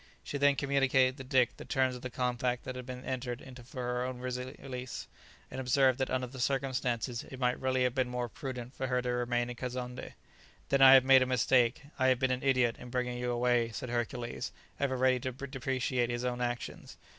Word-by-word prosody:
She 140 - -4
then 140 0 +5
communicated 135 -2 +2
to 135 - -7
Dick 130 -2 +2
the - - -8
terms 130 -1 +1
of 125 - -9
the 130 - -5
compact 125 0 -1
that 130 - -5
had 125 0 -7
been 125 0 -7
entered 125 -2 -3
into 130 -2 -11
for 125 +1 -7
her 125 0 -1
own 130 0 -4
release, 125 0 -5 0.4
and 130 - -4
observed 130 0 +3
that 130 - 0
under 130 0 0
the 130 +1 -10
circumstances 125 -2 -1
it 130 - -10
might 125 -1 +1
really 130 -1 +1
have 125 -1 +1
been 130 -1 0
more 125 0 -2
prudent 125 0 -6
for 130 - -3
her 125 0 0
to 125 - -2
remain 120 0 0
in - - -7
Kazonndé. 125 0 -5 0.6
"Then 140 0 +3
I 135 0 +10
have 130 -1 +6
made 135 0 +7
a 130 - +2
mistake; 125 0 +3 0.2
I 130 - +4
have 130 -1 +4
been 130 +1 +1
an 130 0 -1
idiot, 130 -4 +2
in 125 - -9
bringing 125 -1 -2
you 125 0 -2
away," 120 -1 +2
said 115 +3 -6
Hercules, 120 0 -3 0.3
ever 135 -2 0
ready 130 0 +3
to 130 +1 -3
depreciate 130 -2 -1
his 120 +1 -2
own 125 0 -2
actions. 120 0 -4
125 Hz, 215 wpm, -31 LUFS, 125-130 Hz, 0.6 s, I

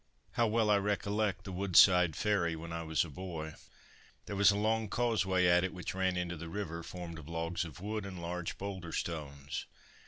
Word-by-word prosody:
How 120 -2 +2
well 110 -1 +2
I 105 - +6
recollect 100 0 0
the 95 - -6
Woodside 90 -2 +5
Ferry 95 -6 +1
when 85 +1 -7
I 85 - -3
was 80 0 +1
a - - -9
boy. 80 -1 -6 0.7
There 100 - -5
was 100 -1 +6
a 100 - +3
long 110 +1 +1
causeway 100 -6 +2
at 90 0 +5
it, 95 0 -2
which 90 - -4
ran 95 -1 0
into 90 -1 -2
the 85 +1 -7
river, 85 -3 -4
formed 85 -1 -7
of 80 -1 -11
logs 85 +2 -2
of 80 -1 -9
wood 105 +2 -3
and 95 -2 -7
large 85 0 -4
boulder 95 -4 -5
stones. 70 -4 -4
90 Hz, 195 wpm, -33 LUFS, 85-100 Hz, 0.7 s, I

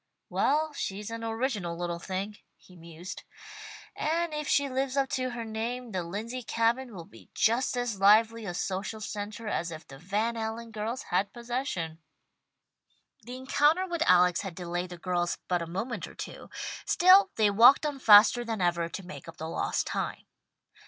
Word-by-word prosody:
"Well, 305 +2 +1
she's 205 -4 -4
an 230 0 -5
original 225 -7 -2
little 175 -1 -3
thing," 195 +4 -4 0.2
he 180 - -19
mused, 170 +1 -9 0.7
"and 330 +1 -1
if 300 -1 -3
she 280 0 +3
lives 265 +1 -2
up 270 -1 +2
to 255 0 -1
her 240 -2 -5
name 230 +2 -4
the 185 -2 -2
Lindsey 215 +9 -5
Cabin 230 +1 0
will 170 -3 -8
be 110 - -17
just 245 +3 +2
as 240 -5 -2
lively 220 +3 +5
a 175 - -4
social 195 +4 -3
centre 210 +1 -6
as 175 -4 -1
if 160 -1 -9
the 135 0 -12
Van 210 +7 -1
Allen 225 +1 -4
girls 220 +4 -4
had 195 +3 +1
possession." 235 - -4 1.2
The 245 +3 -8
encounter 295 +7 +2
with 345 -3 -4
Alex 180 0 +5
had 195 -4 -6
delayed 175 0 -4
the 175 - -8
girls 175 -1 -1
but 180 -1 0
a 170 - -4
moment 195 +8 -4
or - - -14
two, - - -8 0.4
still 375 +2 +6
they 215 -2 +3
walked 245 +8 +7
on 290 -2 -2
faster 220 +1 +7
than 225 -2 -3
ever 170 -2 +1
to 190 +2 -7
make 180 - -10
up 165 - -10
the 160 - -5
lost 165 - -1
time. - - -4
220 Hz, 175 wpm, -29 LUFS, 180-250 Hz, 1.2 s, walked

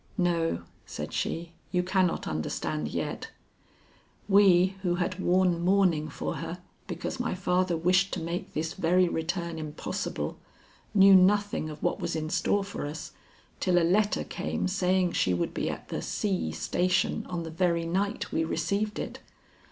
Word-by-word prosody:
"No," 170 - +1 0.2
said - - -6
she, 170 0 -2 0.2
"you 180 -1 +1
cannot 185 -1 +1
understand 75 -1 -2
yet. - - -4 1.0
We 190 -2 +5
who 175 -2 +1
had 185 +1 -2
worn 180 -2 +2
mourning 180 -5 +3
for - - -4
her - - -5 0.3
because - - -4
my - - -1
father 180 -1 +1
wished 185 +4 +3
to - - -3
make 170 +2 -4
this 160 +2 -1
very 180 0 +3
return 170 0 -2
impossible, 155 -1 -4 0.6
knew 195 0 +8
nothing 200 -3 +3
of 150 0 -9
what - - 0
was 170 -3 -2
in 155 0 -3
store 195 +3 +1
for 195 -6 -5
us 155 +2 -6 0.5
till 180 -2 +2
a 170 - +4
letter 205 +4 +2
came - - -2
saying 185 -1 +2
she 90 - +1
would 85 - -1
be - - -1
at - - -6
the - - -3
C. 85 -5 -1
station 180 - 0
on 175 -2 -3
the 165 - -6
very 170 0 +1
night 200 +4 -1
we 160 - +1
received 210 +5 -1
it. - - -5
180 Hz, 160 wpm, -28 LUFS, 165-190 Hz, 1.0 s, knew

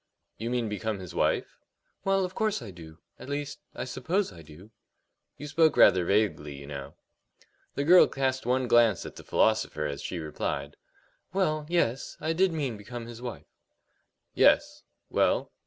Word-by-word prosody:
"You 115 +2 -3
mean 120 -2 0
become 105 +1 -3
his 90 -3 -9
wife?" - - 0 0.5
"Well, 195 -1 +2
of 180 - -7
course 215 0 0
I 105 - -8
do 80 -3 -12 0.2
at 130 - -10
least, 145 0 -4 0.2
I - - -4
suppose 160 +10 -1
I 85 - -12
do." 80 +7 -15 0.7
"You 145 - -8
spoke 160 +2 +3
rather 90 - +6
vaguely, 85 -8 0
you 70 0 -10
know." 70 0 -8 0.8
The 140 - 0
girl 180 +4 +7
cast 130 -1 -1
one 125 +1 +1
glance 115 -5 +4
at - - -8
the - - -11
philosopher 110 -8 +1
as 70 -1 -4
she 90 - -4
replied: 75 -2 -4 0.6
"Well, 155 -6 0
yes; 135 -8 0
I 160 +2 -1
did 185 +2 +3
mean 140 -8 -2
become 115 +3 -8
his 120 0 -10
wife." 125 -1 -7 0.9
"Yes. - - +3 0.3
Well?" - - +1
120 Hz, 165 wpm, -28 LUFS, 90-150 Hz, 0.9 s, girl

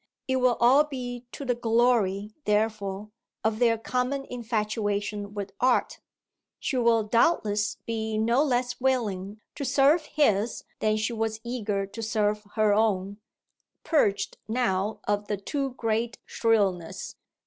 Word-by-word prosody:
It 260 0 +1
will 250 -2 +3
all 260 +5 +6
be 250 -4 -6
to 280 - -7
the 250 - +2
glory, 225 -4 +1
therefore, 210 -1 -1 0.3
of 220 0 0
their 230 -2 +4
common 250 +4 -2
infatuation 210 -3 -2
with 200 -1 -4
"art": 255 0 +2 0.6
she 275 - -2
will 230 -2 +3
doubtless 210 -3 +2
be 220 -1 -2
no 235 +6 +3
less 250 -3 -1
willing 210 -6 -1
to 290 - -5
serve 280 +4 +3
his 225 -7 +1 0.2
than 215 0 +1
she 215 +2 -1
was 220 -1 -2
eager 215 -5 -2
to 205 +4 -8
serve 210 -1 0
her 215 -2 +3
own, 205 -2 +1 0.7
purged 200 -11 +1
now 215 -3 0
of 205 0 0
the 205 - -1
too 270 +5 -3
great 230 +1 -1
shrillness. 200 -7 0
225 Hz, 135 wpm, -27 LUFS, 205-245 Hz, 0.7 s, all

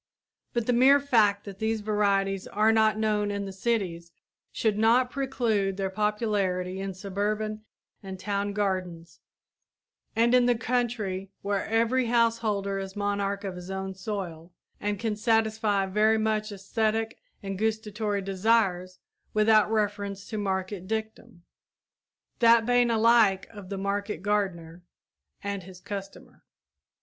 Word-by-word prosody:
But 235 -2 0
the 245 - +2
mere 265 +4 +6
fact 215 -7 +3
that 200 -1 -9
these 220 0 -1
varieties 200 -2 0
are 215 +2 +3
not 220 -1 +3
known 210 -1 +1
in 200 0 -3
the 195 - -6
cities 190 -6 -2 0.4
should 220 -2 0
not 235 +4 +3
preclude 230 -8 0
their 195 -1 -2
popularity 200 -3 -1
in 195 -1 -4
suburban 210 +3 -3 0.4
and 190 -2 -8
town 200 +1 -2
gardens 185 -4 -3 1.0
and 235 +2 +3
in 250 -1 +5
the 245 -2 +3
country, 225 -6 -2
where 200 -1 -1
every 230 +3 +2
householder 225 -4 +1
is 195 0 -6
monarch 200 -1 -1
of 190 -2 -4
his 180 +1 -9
own 190 0 -4
soil 185 -4 -6 0.3
and 205 0 -2
can 220 -1 -2
satisfy 220 -2 +1
very 215 +3 +3
many 220 0 +1
æsthetic 220 +2 -1 0.3
and 195 -1 -4
gustatory 215 -2 -1
desires 190 -2 +1 0.4
without 215 0 +4
reference 205 -2 -1
to 220 - -4
market 190 -1 -3
dictum, 220 -3 -5 1.0
that 230 -1 +6
bane 245 0 +3
alike 225 -4 +4
of 205 -4 -11
the 200 - -4
market 200 0 -3
gardener 180 -5 -2 0.6
and 200 -1 -3
his 180 0 -12
customer. 195 0 -8
205 Hz, 135 wpm, -27 LUFS, 195-220 Hz, 1.0 s, mere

